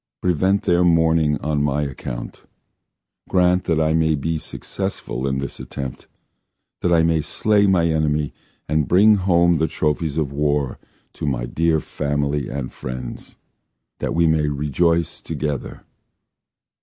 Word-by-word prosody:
Prevent 95 +3 +1
their 85 0 +3
mourning 80 -3 +3
on 75 -1 0
my 75 0 +1
account! 65 -3 -6 0.8
Grant 90 0 +3
that 80 -2 +1
I 80 0 +2
may 80 -1 +2
be 80 +2 -2
successful 65 -3 -5
in 65 0 -1
this 70 +1 -5
attempt 65 +1 -7 0.7
That 90 - +1
I 85 -1 +5
may 80 -1 +2
slay 100 +6 +2
my 90 -3 +3
enemy, 75 -2 0 0.3
And 75 -1 +1
bring 105 +5 +6
home 85 -3 +3
the 80 - +2
trophies 75 -1 -1
of 75 -4 0
war 70 -1 0 0.3
To - - -5
my - - -1
dear 80 +4 +1
family 75 0 -2
and 70 -2 -5
friends, 65 -1 -7 0.6
That - - -2
we 85 0 +3
may 80 -2 +2
rejoice 75 +4 0
together. 75 -2 -4
80 Hz, 140 wpm, -21 LUFS, 70-85 Hz, 0.8 s, bring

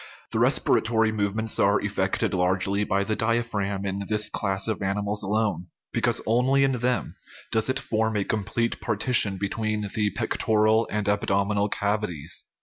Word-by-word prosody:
The - - 0
respiratory 110 0 +2
movements 110 +1 0
are 100 0 +4
effected 100 -1 -1
largely 95 +2 +1
by 100 -1 0
the 110 +2 -1
diaphragm 105 -4 -1
in 100 +1 -3
this 105 -1 +1
class 95 -1 -1
of 110 -2 -2
animals 100 +1 -1
alone, 100 -4 -1 0.3
because - - 0
only 130 +4 +3
in 135 - +3
them 125 0 -1 0.4
does 110 +2 +1
it 130 - +1
form 110 -3 -1
a 100 - +1
complete 115 +2 -2
partition 110 -2 +2
between 105 +1 -2
the 105 -1 +1
pectoral 110 +3 +1
and 105 -1 -2
abdominal 100 0 +1
cavities. 100 -8 -2
105 Hz, 145 wpm, -25 LUFS, 100-110 Hz, 0.4 s, are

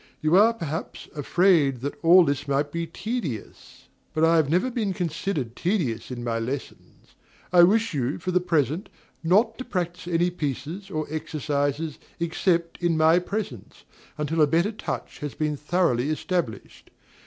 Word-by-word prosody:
You 155 +3 +2
are, 215 +4 +7
perhaps, 160 -5 -5
afraid 150 -4 +3
that 140 +2 -3
all 175 +2 +7
this 145 0 -1
might 140 +1 0
be 170 +1 -3
tedious; 170 - -6 0.3
but 155 +1 +4
I 165 +1 +4
have 155 -3 +2
never 185 - +2
been 220 -6 -1
considered 165 - -3
tedious 165 - -1
in 120 -2 -5
my 115 -1 -1
lessons. 130 +4 -7 0.4
I 175 - +8
wish 215 +4 +4
you, 135 0 -1
for 185 +1 -3
the 180 - +3
present, 165 -1 0 0.3
not 215 +8 +3
to - - -3
practise 175 -7 -3
any 175 +1 +2
pieces 165 +4 -4
or 155 -5 -2
exercises 150 -1 -2 0.2
except 170 0 0
in 170 -2 +2
my 160 +2 +5
presence, 180 - -6 0.3
until 155 +2 0
a 150 - +6
better 170 +8 +2
touch 215 - -5
has 145 -2 -5
been 150 -1 -1
thoroughly 150 -4 +1
established. 155 - -3
165 Hz, 155 wpm, -25 LUFS, 145-180 Hz, 0.4 s, I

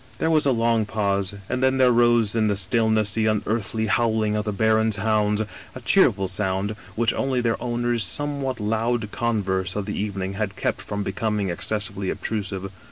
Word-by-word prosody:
" - - -24
There 160 - +1
was 155 -2 +3
a - - +4
long 115 -2 +1
pause, 100 -2 -1
and 130 0 -2
then 130 0 +3
there 130 -1 +5
rose 120 -2 +3
in 110 -1 +2
the 105 - +1
stillness 110 +2 +1
the 110 -1 +1
unearthly 110 0 -1
howling 110 0 +1
of 105 +1 -1
the 105 - -1
baron's 110 +1 +2
hounds, 105 0 +1 0.3
a 130 - -7
cheerful 110 - +3
sound 95 +1 -1 0.2
which 115 0 +2
only 135 -2 0
their 115 -2 0
owner's 120 -1 0
somewhat 140 -2 -1
loud 110 +1 -1
converse 95 -6 -1
of 105 -1 -2
the 105 - -4
evening 100 -2 -3
had 100 -1 -3
kept - - -2
from 100 0 -4
becoming 105 -1 -1
ex 85 - -3
cessively 100 -2 -2
obtrusive. 95 -3 -4
110 Hz, 185 wpm, -24 LUFS, 100-115 Hz, 0.3 s, there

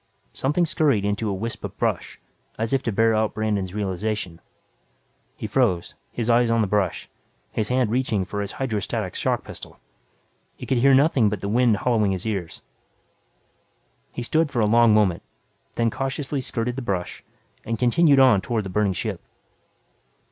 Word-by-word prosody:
Something 150 +6 +1
scurried 145 - +1
into 105 +1 -1
a - - -1
wisp 115 +4 -5
of - - -7
brush, - - -2 0.4
as 115 +3 -2
if 135 - +2
to 115 - -2
bear 115 +2 +3
out 110 0 0
Brandon's 105 -3 -2
realization. 100 -3 -3 0.9
He - - -7
froze, 85 -2 0 0.2
his 115 -2 -3
eyes 120 0 +4
on 115 0 +2
the - - +2
brush, 95 -3 -1 0.4
his 110 - -1
hand 125 -3 +1
reaching 115 -6 0
for 100 +2 -4
his 100 0 -4
hydro 120 -6 -2
static 100 -2 -3
shock - - -1
pistol. - - -10 0.8
He - - -9
could 130 - +1
hear 135 +2 +5
nothing 135 -6 +4
but 105 - -4
the 100 - -3
wind 115 -1 +3
hollowing 110 -4 +1
his 95 +1 -5
ears. 95 -7 -4 1.5
He 120 - -5
stood 160 +5 +1
for 130 - -2
a 110 - +3
long 115 +1 +5
moment, 105 -5 +3 0.5
then 115 -1 +1
cautiously 135 +2 -3
skirted 120 0 -3
the - - -3
brush, 95 -7 -4 0.4
and 115 0 -3
continued 140 +4 +4
on 125 -7 +6
toward 110 0 -2
the - - -5
burning 100 0 +1
ship. 90 - -4
110 Hz, 170 wpm, -23 LUFS, 100-125 Hz, 1.5 s, on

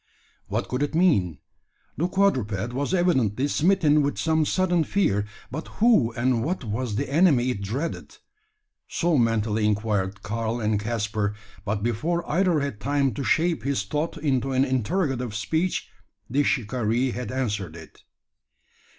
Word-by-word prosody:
What - - -2
could 125 +2 -2
it 145 +2 -1
mean? 100 - +3 0.6
The 170 - 0
quadruped 120 - 0
was 140 +4 -2
evidently 140 - +2
smitten 155 -1 +3
with 145 0 -1
some 160 -1 +2
sudden 180 -3 +2
fear; 105 - +1 0.2
but 155 +5 -5
who 215 - +4
and 120 -1 +1
what 170 +2 -2
was 115 0 -3
the - - -1
enemy 140 -4 +3
it 100 - -5
dreaded? 130 +12 -4 0.7
So 170 -1 0
mentally 110 -3 +1
inquired 105 -2 0
Karl 115 +3 -2
and 105 -2 0
Caspar; 105 -2 -2 0.3
but 105 0 -2
before 155 +10 -1
either 175 -2 +2
had 140 -7 -3
time 140 +2 +1
to 135 - -4
shape 165 -1 +1
his 135 -3 -1
thought 150 +11 -3
into 135 -3 0
an 130 +1 +3
interrogative 130 - -1
speech, 160 - -1 0.4
the 135 +6 +1
shikaree 120 -1 0
had 125 -1 -5
answered 105 -10 -2
it. 80 -1 -13
130 Hz, 145 wpm, -25 LUFS, 110-155 Hz, 0.7 s, who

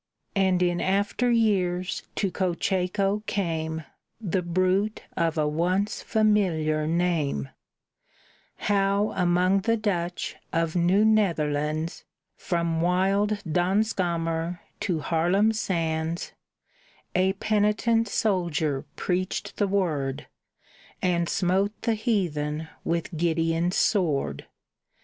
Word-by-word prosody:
And 190 -2 +3
in 175 -1 +1
after 200 +5 +1
years 190 -6 +1
to 195 -3 0
Cocheco 190 +2 0
came 160 -4 -2 0.4
The 190 -4 -1
bruit 185 +4 0
of 165 -1 0
a 150 -1 +2
once 180 +7 0
familiar 175 -9 +1
name; 160 - 0 1.1
How 200 +1 +1
among 180 +2 +3
the 230 +4 +1
Dutch 180 -5 -2
of 165 0 0
New 180 +4 +3
Netherlands, 155 -6 +1 0.3
From 170 -2 -1
wild 195 +4 +1
Danskamer 175 -2 0 0.2
to 170 -5 -1
Haarlem 180 +8 +2
sands, 165 -5 -2 0.8
A 185 +1 +2
penitent 215 +3 +1
soldier 170 -9 0
preached 185 +1 -2
the 205 - +2
Word, 155 -9 -1 0.8
And 170 -2 +1
smote 195 +3 +1
the 230 - +2
heathen 160 - -1
with 170 +1 -2
Gideon's 165 +1 +1
sword! 150 - +1
180 Hz, 95 wpm, -26 LUFS, 165-200 Hz, 1.1 s, And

